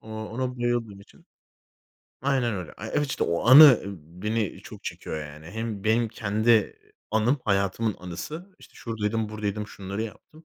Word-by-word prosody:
O 110 - -13
ona 115 +4 -4
bayıldığım 120 -4 -1
için. 100 - -20 1.0
Aynen 130 -4 +1
öyle. 90 -5 -6
Evet 110 +8 -1
işte 135 - -1
o 85 +6 -1
anı, 135 -1 +10
ımm, 90 -2 -10
beni 110 -1 -1
çok - - -12
çekiyor, 80 - -5
yani. 75 +2 -12
Hem 110 -1 -5
benim 115 +2 +2
kendi, 110 +1 0
eee, 110 -3 +4 0.4
anım 110 +6 +2
hayatımın 100 +1 +1
anısı. 150 - -7
İşte - - -18
şuradaydım, 110 -1 -2
buradaydım, 105 -1 -3
şunları 100 +1 -5
yaptım. 155 +8 -10
110 Hz, 155 wpm, -26 LUFS, 100-120 Hz, 1.0 s, anı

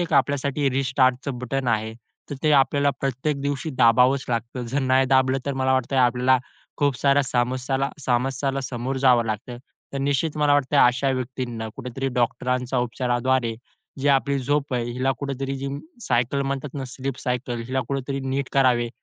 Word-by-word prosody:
एक 175 - -2
आपल्यासाठी 140 0 +1
रिस्टार्टचं 130 0 +1
बटन 125 +1 -2
आहे. 110 -1 0 0.4
तर 145 - -3
ते 155 -1 +3
आपल्याला 140 +1 +3
प्रत्येक 135 +2 -1
दिवशी 140 +2 -2
दाबावंच 125 +4 +5
लागतं. 120 +1 -3
जर 130 +4 -1
नाही 130 0 +3
दाबलं 130 0 +3
तर 140 - 0
मला 130 0 +1
वाटतं, 130 +1 0
आपल्याला 125 +1 +4 0.4
खूप 145 -3 +1
साऱ्य 140 0 +4
समस्यांना 130 +2 0 0.2
समस्यांना 135 +2 0
समोर 130 +1 -3
जावं 125 -3 +4
लागतं. 110 +3 -4 0.4
तर 140 - -3
निश्चित 145 +3 0
मला 150 -1 +3
वाटतंय, 145 0 +2
अशा 125 +3 +1
व्यक्तींना 125 -3 -4
कुठेतरी 135 +1 -4
डॉक्टरांच्या 125 +1 0
उपचाराद्वारे 120 0 0 0.5
जी 140 - +1
आपली 140 0 +2
झोप 140 +1 -1
आहे, 120 -1 0
हिला 130 +2 0
कुठेतरी 135 -1 -3 0.5
सायकल 125 +3 +1
म्हणतात 140 0 -4
ना 135 -2 -4
स्लीप 130 +1 -5
सायकल. 125 -2 -2
हिला 130 +1 -1
कुठेतरी 135 0 -2
नीट 135 0 -2
करावे 125 -3 +3
130 Hz, 160 wpm, -24 LUFS, 125-140 Hz, 0.5 s, दाबावंच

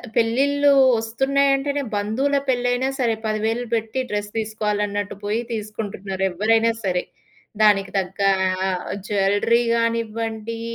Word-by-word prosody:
పెళ్ళిళ్ళు 280 +5 +3 0.3
ఒస్తున్నయంటేనే 275 +4 +1
బంధువుల 245 +8 0
పెళ్లయినా 245 +1 +1
సరే 230 -3 +1
10,000 220 +3 -1
పెట్టి 225 +3 -2
డ్రెస్ 205 0 -3
తీసుకోవాలన్నట్టు 210 -2 -2
పోయి 215 +3 0
తీసుకుంటున్నారు 205 -3 -4
ఎవ్వరైనా 225 +5 +2
సరే. 180 -1 0 0.6
దానికి 195 -3 +4
తగ్గా 195 +1 0 0.4
ఆహ్, 180 -1 -2 0.2
జ్యువెల‌రీ 205 +3 +2
గానివ్వండి, 230 -1 -2
220 Hz, 100 wpm, -22 LUFS, 205-240 Hz, 0.6 s, దానికి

